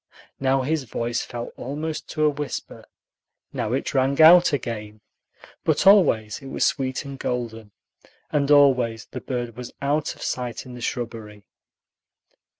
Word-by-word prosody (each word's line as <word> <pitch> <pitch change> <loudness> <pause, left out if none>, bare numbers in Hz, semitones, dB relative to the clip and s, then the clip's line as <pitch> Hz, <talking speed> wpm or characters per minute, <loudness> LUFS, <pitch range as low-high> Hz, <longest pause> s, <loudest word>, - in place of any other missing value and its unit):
Now 135 0 +2
his 150 0 -1
voice 120 +1 -2
fell 120 0 -7
almost 150 +4 -5
to 155 - -1
a - - +5
whisper, 145 0 -6 0.7
now 105 - -2
it 135 - -2
rang 135 +1 +1
out 170 +3 +8
again; 110 -6 -4 0.6
but 155 +2 +1
always 145 - +4
it 135 - -10
was 135 - 0
sweet 130 0 -1
and 140 -1 -8
golden, 115 -3 -4 0.6
and 145 -2 +1
always 125 -6 +4
the - - -8
bird 120 -3 -4
was 125 0 -8
out 145 +2 -1
of - - -10
sight 125 -1 -3
in 125 - -10
the 125 - -9
shrubbery. 110 -4 -5
130 Hz, 150 wpm, -24 LUFS, 115-145 Hz, 0.7 s, out